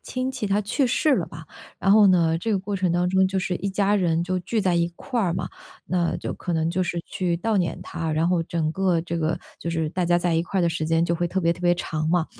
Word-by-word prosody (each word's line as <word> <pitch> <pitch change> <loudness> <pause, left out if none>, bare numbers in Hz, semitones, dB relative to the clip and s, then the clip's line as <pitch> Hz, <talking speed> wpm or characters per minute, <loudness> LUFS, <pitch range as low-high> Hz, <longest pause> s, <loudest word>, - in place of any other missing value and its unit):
亲 255 +1 -2
戚 260 -5 -3
他 200 +1 +1
去 255 +6 0
世 285 +4 +2
了 - - -1
吧， - - -10 0.4
然 195 - +2
后 210 0 +7
呢， 165 -3 +3
这 225 +5 -1
个 195 - +1
过 200 +1 -3
程 185 -2 +1
当 175 +1 +1
中 190 0 +4
就 190 0 -1
是 180 -1 -1
一 200 - -3
家 200 +1 +2
人 170 -3 +1
就 185 +1 -1
聚 220 +5 -1
在 185 -3 +1
一 170 0 +2
块 240 +6 -3
儿 175 -4 0
嘛。 - - -3 0.4
那 175 -2 0
就 - - -4
可 180 - -5
能 160 0 +1
就 185 +2 -1
是 170 0 -2
去 185 -4 -1
悼 225 +2 0
念 175 -2 -1
他， 160 -1 -4
然 160 +3 +1
后 180 -2 +2
整 160 -2 -1
个 180 -1 +1
这 170 0 -4
个 165 +1 0 0.2
就 - - -5
是 165 -2 -1
大 180 +2 -1
家 175 0 +3
在 175 0 0
一 165 - +1
块 190 0 -1
的 170 - +3
时 160 -1 -2
间 165 +1 +2
就 170 - 0
会 175 +1 0
特 190 +2 -1
别 170 -1 +2
特 175 - -12
别 175 0 +3
长 155 -2 -3
嘛， 175 -1 +2
175 Hz, 300 characters per minute, -24 LUFS, 170-195 Hz, 0.4 s, 后